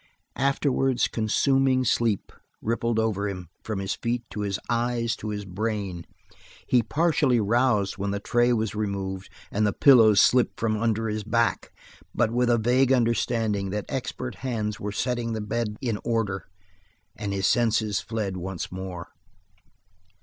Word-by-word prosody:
Afterwards, 135 -1 +1
consuming 130 +3 +2
sleep 115 -3 +1 0.3
rippled 115 0 -1
over 105 -2 0
him 90 -4 -7
from 110 -2 -3
his 95 0 -2
feet 120 0 -2
to 105 - -4
his 100 -1 -1
eyes 115 -1 0
to 110 - -5
his 105 -1 -4
brain. 100 -2 -3 0.6
He 125 - +4
partially 145 0 +2
roused 105 -3 +1
when 100 +1 -1
the 100 0 -2
tray 120 +4 +2
was 110 -3 0
removed, 100 -3 -3 0.2
and 105 - 0
the 105 - 0
pillows 115 -7 +6
slipped 125 -1 +3
from 110 -1 +1
under 115 0 0
his 105 0 -2
back, 115 +2 0 0.4
but 110 - +2
with 120 +1 +1
a 120 - +4
vague 125 +3 +3
understanding 115 -4 +1
that 105 +1 -3
expert 130 -2 -4
hands 110 -5 -2
were 105 - -4
setting 120 +1 -2
the 110 - -2
bed 105 0 -2
in 115 -5 -1
order 110 -5 -1 0.7
his 100 -2 -2
senses 110 -3 +2
fled 105 -4 -3
once 90 -1 -5
more. 90 -2 -6
110 Hz, 150 wpm, -26 LUFS, 100-120 Hz, 0.7 s, pillows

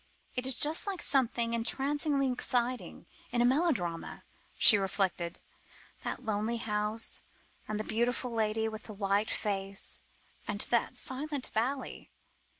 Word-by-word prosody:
"It 250 0 -1
is 265 - +3
just 310 +7 +1
like 390 -3 -2
something 235 -3 +2
entrancingly 275 +3 +1
exciting 250 0 -1 0.3
in 240 - 0
a 240 - +5
melodrama," 245 - +1 0.3
she 220 - +9
reflected: 190 -3 -1 0.6
"that 255 - -4
lonely 220 +2 0
house, 210 0 -1 0.5
and 215 0 -2
the - - -1
beautiful 240 +3 0
lady 220 -1 +1
with 215 0 -6
the 215 - -7
white 200 +1 +1
face, 195 -1 -2 0.5
and 205 0 -1
that 240 +1 +2
silent 280 +1 -4
valley." 255 +5 -2
230 Hz, 130 wpm, -31 LUFS, 210-260 Hz, 0.6 s, she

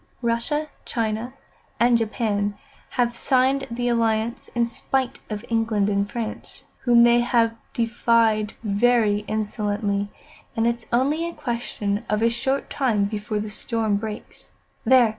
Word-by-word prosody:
"Russia 235 +7 0 0.2
China, 225 +1 -2 0.5
and 240 0 +5
Japan 210 -3 0 0.4
have 240 -1 +2
signed 265 +2 +2
the 245 +1 -2
alliance, 230 -1 0
in 235 0 +3
spite 255 +2 -2
of 210 +1 -5
England 225 -3 +1
and 200 0 0
France, 225 -1 -5 0.2
whom 240 -1 +6
they 240 0 +6
have 235 -2 +2 0.2
defied 230 -2 +2
very 215 0 +3
insolently, 205 -1 -1 0.5
and 225 - +1
it's 235 0 -1
only 290 +7 +1
a - - -8
question 230 -5 -2
of 210 +1 +1
a 230 - +5
short 265 +4 -1
time 235 -8 +1
before 210 +1 -3
the 210 0 -3
storm 220 -1 -1
breaks. 215 0 -7 0.4
There! 250 -1 +6
230 Hz, 135 wpm, -24 LUFS, 210-240 Hz, 0.5 s, whom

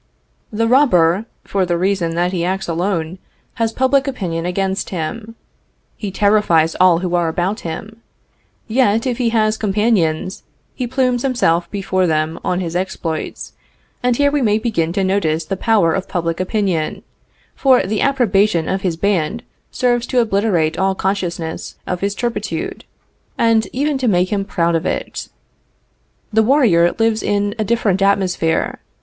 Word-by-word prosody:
The 230 +1 0
robber, 215 - +4 0.2
for 195 -1 -1
the 175 -1 0
reason 180 -2 0
that 175 +1 +1
he 175 -3 -2
acts 190 +2 -2
alone, 170 0 -2 0.4
has 225 -1 +2
public 260 +3 +2
opinion 175 -10 -3
against 190 +2 -2
him. 210 +7 -5 0.6
He 205 - -5
terrifies 195 -5 +2
all 185 -2 +6
who 180 - -2
are 175 -1 +2
about 180 +6 -1
him. 205 +7 -7 0.7
Yet, 230 -1 +2
if 250 -2 -2
he 240 -2 +2
has 215 -1 +1
companions, 195 -4 0 0.3
he 250 -2 -3
plumes 250 -1 +1
himself 175 -11 +1
before 185 -2 0
them 155 0 -1
on 180 +1 -1
his 170 -1 -4
exploits, 175 -3 -4 0.5
and 245 -1 +1
here 285 0 +3
we 290 -1 +1
may 215 -3 +3
begin 215 -8 -1
to 195 - 0
notice 170 -5 0
the 195 - -2
power 200 -5 +2
of 190 - -2
public 165 -2 -2
opinion, 185 -4 -1 0.5
for 260 -2 +3
the 210 +2 -1
approbation 210 - +2
of 190 0 -1
his 180 -5 -1
band 200 +3 0 0.3
serves 245 -1 0
to 255 - +1
obliterate 195 -8 +1
all 190 0 +1
consciousness 175 -4 -3
of 180 -1 -3
his 200 +1 -1
turpitude, 240 -1 -3 0.5
and 225 -2 +3
even 285 +1 -1
to 255 - 0
make 185 -1 +2
him 200 -1 -1
proud 170 -3 0
of 165 +2 0
it. - - -4 1.0
The 220 - +5
warrior 215 - +3
lives 225 -1 +1
in 205 0 0
a - - +2
different 210 -3 +1
atmosphere. 190 -4 +1
195 Hz, 155 wpm, -18 LUFS, 175-225 Hz, 1.0 s, all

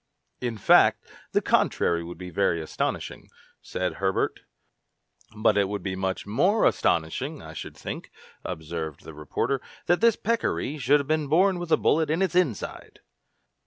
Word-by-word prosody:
"In 120 -3 -3
fact, 100 - +5 0.3
the - - +1
contrary 85 0 +2
would 85 +1 -8
be 90 -1 -8
very 85 -1 +1
astonishing," 80 - -4 0.3
said 90 0 -3
Herbert. 95 -1 0 1.0
"But 110 -1 +3
it 100 -1 +1
would 100 -3 -4
be 95 -2 -2
much 95 0 -2
more 180 - +2
astonishing, 80 -1 0
I - - -9
should - - -8
think," - - -6 0.3
observed 80 -1 -5
the 80 - -10
reporter, 75 - -2 0.2
"that 175 +3 +2
this 230 -2 +5
peccary 215 - -1
should 140 +3 +4
have 140 - -9
been 155 -1 0
born 180 +5 +3
with 175 -2 -6
a - - +6
bullet 160 0 +2
in 165 +5 +1
its 190 - 0
inside!" 175 - -1
110 Hz, 160 wpm, -26 LUFS, -, 1.0 s, a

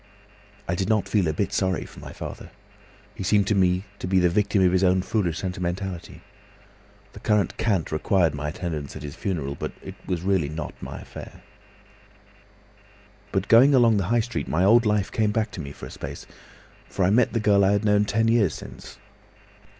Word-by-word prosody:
"I 85 - 0
did 95 +3 -2
not 110 -2 +2
feel 100 -6 +1
a 80 - 0
bit 100 +6 -2
sorry 95 -2 0
for - - -13
my - - -9
father. - - -8 0.6
He - - -9
seemed 100 +1 +3
to 105 - +1
me 95 -1 +2
to - - -4
be 95 +1 +2
the 90 -1 +4
victim 100 0 +2
of 90 - +4
his 95 +1 +2
own 90 0 +3
foolish 95 -5 -1
sentimentality. 90 -1 -4 0.9
The - - -10
current 105 -2 +1
cant 100 -7 0
required 80 +1 +2
my 75 0 -3
attendance 75 -3 -5
at - - -8
his 70 -1 -7
funeral, 75 -8 -3
but - - -5
it - - -7
was 90 -2 -2
really 95 -6 +1
not 75 0 -5
my - - -7
affair. - - -11 1.9
"But 95 +1 -1
going 130 +5 +6
along 115 -4 +5
the 100 - 0
High 115 +5 +2
Street, 120 +2 -4
my 85 +4 +1
old 115 +3 +5
life 105 -2 +1
came 110 -2 +1
back 110 0 -1
to 85 - -6
me 70 -2 -7
for - - -10
a - - -10
space, - - -8 0.6
for 95 - 0
I 95 - +3
met 120 +3 +3
the 115 - +1
girl 100 -2 +4
I 95 +1 +4
had 100 +1 0
known 105 0 +3
ten 110 +3 +1
years 110 -8 +2
since. - - -11
95 Hz, 200 wpm, -24 LUFS, 85-105 Hz, 1.9 s, going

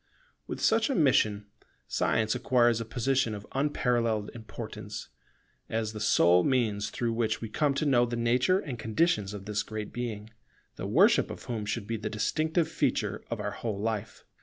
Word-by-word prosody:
With - - -5
such 225 +2 +3
a 275 - 0
mission, 110 - +3 0.4
Science 110 0 +1
acquires 120 -2 +2
a - - -4
position 120 0 0
of 100 0 -8
unparalleled 120 -6 0
importance, 110 -2 -8 0.6
as 110 -1 -2
the 110 - -6
sole 90 -4 +4
means 110 -6 +1
through 115 -1 -2
which 110 -1 0
we 115 - -5
come 145 +1 +1
to 155 - 0
know 120 -4 +4
the 120 - -3
nature 125 +9 +2
and 135 - -6
conditions 110 - +1
of 100 -2 -8
this 105 0 -1
Great 110 -1 -6
Being, 110 -3 -5 0.4
the - - -5
worship - - +4
of - - -8
whom 110 -4 -4
should 105 0 -2
be 115 +1 -2
the 110 0 -4
distinctive 155 - 0
feature 160 - -1
of - - -3
our - - -2
whole 110 -4 -4
life. 110 0 -3
115 Hz, 175 wpm, -29 LUFS, 105-130 Hz, 0.6 s, sole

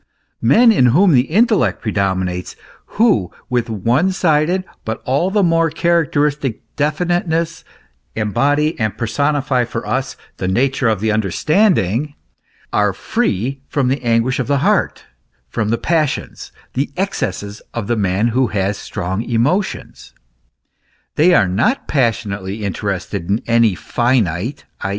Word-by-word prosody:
Men 225 - +5
in 130 - +4
whom 175 +10 +4
the 130 -2 +3
intellect 215 +3 +2
predominates, 95 -4 -2 0.4
who 160 - +3 0.2
with 120 -2 0
one 120 - +1
sided 175 0 +1 0.2
but 110 0 -4
all 140 +8 +1
the 205 0 +2
more 165 -1 +3
characteristic 150 -7 0
definiteness, 165 +2 -1 0.5
embody 145 - +1
and 110 -2 -1
personify 140 +2 0
for 115 -1 -5
us 135 +1 -2 0.2
the 95 - -3
nature 130 +6 +1
of 110 -3 -1
the 110 0 +1
understanding, 145 - +1 0.6
are 105 -1 +2
free 135 - -2
from 135 -3 0
the 135 +2 -1
anguish 120 +2 +1
of 130 - -1
the 140 0 +2
heart, - - +1 0.4
from 105 - -2
the 115 - +1
passions, 155 -1 -2 0.2
the 135 +3 -1
excesses 110 - -3
of 115 -3 -2
the 120 - 0
man 100 +2 +1
who 125 +2 +1
has 100 -1 -1
strong 95 +4 -4
emotions; 130 - -2 1.0
they 170 +5 +4
are 105 -5 +4
not 115 - 0
passionately 105 -6 -1
interested 90 -2 -3
in 100 +3 +2
any 115 -4 +3
finite, 120 - -1 0.2
i. - - -2
125 Hz, 130 wpm, -18 LUFS, 105-155 Hz, 1.0 s, Men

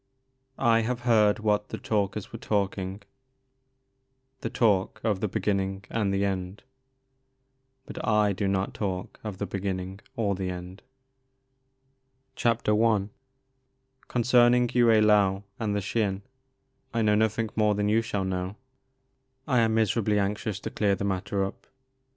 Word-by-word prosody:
" 130 0 -46 0.2
I 115 - +4
have 120 +2 -3
beard 110 -4 +4
what 105 -1 0
the - - -4
Talkers 100 -2 -2
were - - -6
talking,— 100 -1 -2 1.4
the - - -3
talk 105 -2 +1
Of 105 -4 +1
the 105 - 0
beginning 95 0 -1
and 105 -3 0
the 100 0 +1
end; 95 +1 -4 1.2
Bnt - - -7
I 105 -2 +3
do 100 +1 -1
not 95 0 -1
talk 95 -3 -4
of 105 -3 -5
the 100 - -2
beginning 95 0 -4 0.2
or 105 -5 0
the 95 -1 -3
end." 90 +2 -7 1.6
I. 110 -2 +2 1.0
CONCERNING 120 0 +4
Yue 120 -1 +4
Uou 105 -3 +4 0.2
and 105 -3 -1
the 100 - 0
Xin 100 0 -1 0.7
I 115 - +2
know 105 -1 +3
nothing 110 +1 +1
more 105 -1 +3
than 105 0 0
you 110 +2 +3
shall 105 -4 -2
know. 95 +1 -3 0.9
I 130 -4 +3
am 110 -1 +2
miserably 110 -1 +2
anxious 105 0 -1
to - - -5
clear 100 -2 +1
the 100 - -3
mat 95 -2 -1
ter 100 -1 0
up. 95 - -9
105 Hz, 145 wpm, -27 LUFS, 95-110 Hz, 1.6 s, I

